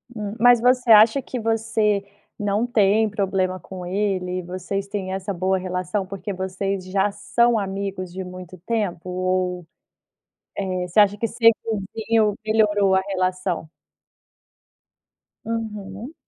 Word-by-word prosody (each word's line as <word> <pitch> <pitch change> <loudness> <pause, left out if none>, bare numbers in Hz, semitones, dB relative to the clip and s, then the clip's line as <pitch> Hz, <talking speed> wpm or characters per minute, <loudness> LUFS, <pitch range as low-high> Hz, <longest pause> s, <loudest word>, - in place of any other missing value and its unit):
Hum. 210 -1 -5
Mas 245 0 +6
você 250 -1 +3
acha 220 +5 +7
que 250 -1 -5
você 220 -2 +1 0.4
não 205 +2 0
tem 220 -2 +3
problema 190 -2 -1
com 185 +1 -9
ele? 185 -1 -1
Vocês 185 +2 -4
têm 195 -2 -4
essa 195 +1 -3
boa 190 +1 0
relação, 185 +2 -2
porque 195 +1 -6
vocês 190 0 -3
já 195 +2 +1
são 235 +3 +2
amigos 195 -2 -4
de 190 +2 -5
muito 185 0 -10
tempo? 200 -6 -2
Ou, 180 -1 -1 0.9
eh, 185 -2 -2
você 180 +5 +2
acha 205 0 +5
que 230 - -1
ser 230 0 +5 0.4
vizinho, 220 -1 +2
melhorou 205 -3 +3
a 190 - +3
relação? 185 -3 -2 1.8
Aham. 220 +2 -5
195 Hz, 130 wpm, -23 LUFS, 185-215 Hz, 1.8 s, acha